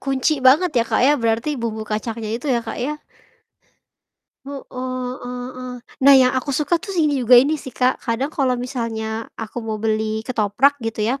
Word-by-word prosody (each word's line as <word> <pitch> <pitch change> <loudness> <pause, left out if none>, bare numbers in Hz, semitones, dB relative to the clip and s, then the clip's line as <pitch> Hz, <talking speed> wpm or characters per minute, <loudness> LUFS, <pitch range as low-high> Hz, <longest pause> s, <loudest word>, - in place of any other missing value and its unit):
kunci 270 +3 0
banget 320 +7 +5
ya, - - +4
Kak, - - +1
ya 290 - +5
berarti 230 +4 0
bumbu 220 -2 -3
kacangnya 215 +1 -4
itu 250 +5 -8
ya, 240 -2 +2
Kak, - - -6
ya? 300 +4 -3 1.5
Heeh 280 -1 -7
heeh 255 -1 -5
heeh. 255 0 -7 0.3
Nah, 275 +1 +8
yang 255 -1 +5
aku 260 +2 -2
suka 300 +5 0
tus 390 0 -6
ini 295 -5 +2
juga 245 +1 +6
ini 285 +5 +4
sih - - -8
Kak, 255 0 +1
kadang 260 +5 -2
kalo 260 -4 +1
misalnya 230 -3 -4
aku 225 +2 -6
mau 220 -1 -4
beli 220 0 -1
ketoprak 255 +4 +1
gitu 225 -2 -3
ya. 260 +5 -1
250 Hz, 180 wpm, -21 LUFS, 225-275 Hz, 1.5 s, Nah